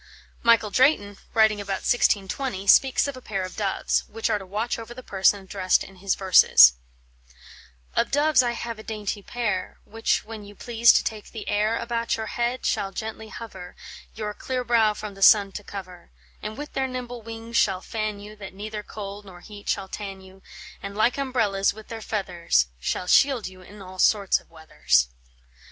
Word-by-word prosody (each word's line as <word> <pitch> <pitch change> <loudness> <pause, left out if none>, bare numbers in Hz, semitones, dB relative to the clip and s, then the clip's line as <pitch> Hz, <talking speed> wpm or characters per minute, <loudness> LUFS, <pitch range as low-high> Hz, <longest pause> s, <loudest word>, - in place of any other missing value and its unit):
Michael 230 -3 +4
Drayton, 205 -6 +2 0.2
writing 220 -2 +4
about 195 -1 -4
1620, 205 -1 +1
speaks 265 +7 +5
of 280 - -5
a 255 - -10
pair 195 -5 -3
of 185 - -7
doves, 200 -3 0
which 225 +1 -2
are 210 - +1
to 190 - -10
watch 215 +5 -2
over 230 +1 -9
the 255 - -9
person 195 -1 +2
addressed 190 -1 +1
in 195 0 -13
his 195 +1 0
verses: 120 - +7 1.2
"Of - - +2
doves 290 -1 +4
I 240 -1 0
have 230 -1 -5
a - - -9
dainty 210 -2 -4
pair, 210 -4 -3
Which, 225 +1 -1
when 220 -1 -8
you 205 0 -13
please 235 +2 +4
to - - +3
take 215 -2 -5
the 220 - -8
air, 210 +2 +1
About 235 -1 -2
your 220 - -4
head 240 +3 -2
shall 195 - 0
gently 220 +2 -6
hover, 190 -7 -9 0.4
Your 210 -1 -4
clear 255 +3 -3
brow 225 -3 +3
from 210 0 -7
the 195 - -14
sun 200 0 +6
to 205 - -7
cover; 185 -3 -9 0.3
And 215 +1 -6
with 295 0 -7
their 265 0 0
nimble 245 -2 -6
wings 230 +1 -5
shall 190 -2 +2
fan 215 -1 -3
you, 210 +1 -10
That 195 -2 -10
neither 210 +1 -6
cold 205 -1 -8
nor 180 -2 -13
heat 205 0 -10
shall 190 - -1
tan 195 -1 -7
you; 190 0 -16 0.4
And, 200 +1 -7
like 235 +5 +2
umbrellas, 220 -8 +1
with 220 0 -13
their 225 -1 -6
feathers 175 - 0
Shall 65 - -2
shield 260 +4 +4
you 185 0 -12
in 200 +2 -13
all 185 0 -11
sorts 200 -1 +3
of - - -24
weathers." 160 - +1
210 Hz, 190 wpm, -25 LUFS, 195-230 Hz, 1.2 s, verses